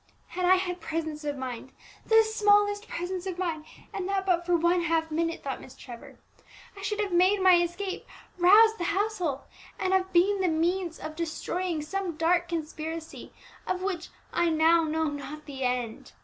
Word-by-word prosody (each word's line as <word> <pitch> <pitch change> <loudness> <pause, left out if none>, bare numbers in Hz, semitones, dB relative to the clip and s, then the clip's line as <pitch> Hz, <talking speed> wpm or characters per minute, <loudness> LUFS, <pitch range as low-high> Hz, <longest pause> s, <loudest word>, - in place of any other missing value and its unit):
"Had 365 0 -2
I 370 +1 +6
had 360 -1 -3
presence 315 -2 -4
of 290 -1 -2
mind, 260 0 -6 0.3
the 445 0 +6
smallest 415 -1 +2
presence 360 +2 -4
of 365 -2 -4
mind, 330 -4 -3 0.3
and 370 0 -3
that 390 -1 0
but 350 -2 +1
for 355 - +3
one 345 +2 +2
half 325 -1 0
minute," 330 +1 -1
thought 270 -1 -4
Miss 255 - -13
Trevor, 240 -2 -11 0.6
"I 395 - -10
should 420 +1 -2
have 410 -2 -1
made 370 +4 +4
my 370 -2 +6
escape, 360 +3 -4 0.3
roused 435 +5 +6
the 345 - -1
household, 370 -8 -1 0.4
and 375 0 0
have 380 0 +1
been 385 +3 +3
the 370 - +2
means 340 +1 0
of 310 0 -7
destroying 335 0 -3
some 360 0 -3
dark 345 +2 +2
conspiracy 320 0 -5 0.4
of 370 0 -2
which 365 -3 -3 0.2
I 345 0 +2
now 325 +1 +4
know 320 +1 -1
not 295 0 -5
the 275 -2 -8
end. 250 -3 -2
345 Hz, 175 wpm, -28 LUFS, 315-380 Hz, 0.6 s, I